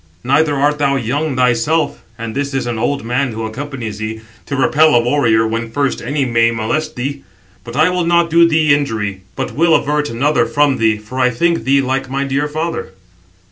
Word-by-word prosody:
Neither 145 +3 +2
art 145 +2 +1
thou 140 -1 +2
young 135 +4 -1
thyself, 130 +5 +1 0.2
and 115 -1 -5
this 140 0 -3
[is] 135 - -1
an 120 -2 -3
old 140 +2 -1
man 125 +1 -1
who 110 0 -4
accompanies 115 -2 -6
thee, 110 +1 -5 0.3
to 140 - -3
repel 150 +3 +4
a - - +6
warrior 120 -3 +2
when 115 +1 -3
first 140 +3 -1
any 140 +3 -1
may 115 -1 +3
molest 115 +8 -2
thee. 140 +2 -4 0.4
But 115 +1 -9
I 160 +4 +3
will 180 -2 -1
not 170 -1 +2
do 170 +1 +6
thee 155 -2 +3
injury, 110 -9 -2
but - - -3
will 165 +1 +3
avert 150 +1 0
another 145 +7 +1
from 145 -2 +2
thee, 110 -1 +2
for 105 +5 -8
I 125 -1 +4
think 170 +8 0
thee 135 +1 +3
like 135 0 -2
my 135 +1 -1
dear 140 +2 -1
father." 155 - -4
135 Hz, 200 wpm, -16 LUFS, 115-150 Hz, 0.4 s, a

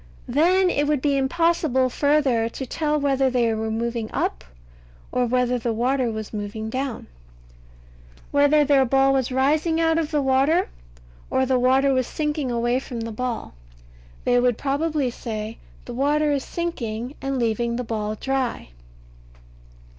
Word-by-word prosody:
Then 360 +8 +3
it 290 +1 0
would 300 -2 +2
be 280 +1 +1
impossible 275 -2 +2
further 275 -6 +2
to 265 - -6
tell 300 +3 -1
whether 270 -2 +2
they 240 -3 +1
were 220 0 -2
moving 230 0 -2
up, 65 0 -2 0.7
or 250 -1 +1
whether 250 0 +1
the 230 0 -1
water 250 +2 +1
was 220 -1 -6
moving 215 +1 -5
down; 260 -1 -3 1.3
whether 285 +1 +4
their 280 -1 +4
ball 270 +1 +3
was 265 -2 0
rising 300 +5 +1
out 325 0 +2
of 315 -2 -2
the 300 - 0
water, 275 +6 +2 0.6
or 260 - +1
the 260 -1 +2
water 265 +2 +3
was 255 -2 +1
sinking 300 -3 -2
away 240 +1 +1
from 245 -3 -6
the 230 0 -4
ball. 240 - -4 0.7
They 245 0 +3
would 245 -2 +2
probably 285 -1 -1
say, 220 -2 -6 0.3
"The 245 - -7
water 295 +4 +1
is 280 -2 0
sinking 245 -8 -4
and 270 0 -2
leaving 235 0 0
the 250 - -2
ball 215 -2 -3
dry." 265 - -2
260 Hz, 155 wpm, -23 LUFS, 235-290 Hz, 1.3 s, whether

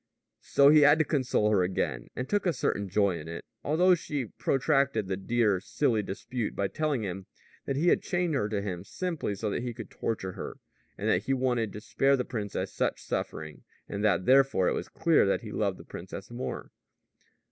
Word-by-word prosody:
So 140 0 +5
he 155 +1 +7
had 145 +1 +7
to 160 - +2
console 125 -8 +1
her 100 -3 +4
again, 90 -9 -1
and 125 - -3
took 205 -2 0
a 175 - +2
certain 100 -9 -1
joy 100 -3 +2
in 75 - -9
it, 85 +1 -7 0.2
although 175 +5 +4
she 145 -6 -2
protracted 135 -2 +1
the 95 - -1
dear, 105 0 +1
silly 115 +2 0
dispute 105 +4 -4
by 100 -1 0
telling 150 -7 -1
him 95 -1 -5 0.4
that 135 - 0
he 165 +6 +3
had - - +3
chained 175 -2 -1
her 120 -7 0
to 100 -2 -2
him 90 -3 -4
simply 160 - -3
so 105 +1 -2
that - - -2
he 120 -2 -4
could - - -8
torture 100 -5 -3
her, - - -7 0.4
and - - -3
that 90 +4 +2
he 135 - +1
had 130 - -1
wanted 120 -5 +1
to 105 - -7
spare 135 +4 +2
the 125 - -2
princess 105 -5 -4
such - - -1
suffering, 75 -1 -4 0.3
and 100 +1 -4
that 105 -3 +2
therefore 135 -8 +4
it - - +2
was - - -4
clear - - +3
that - - +1
he - - -8
loved - - -1
the - - -12
princess 95 +4 -8
more. 120 +2 -5
115 Hz, 210 wpm, -29 LUFS, 100-140 Hz, 0.4 s, he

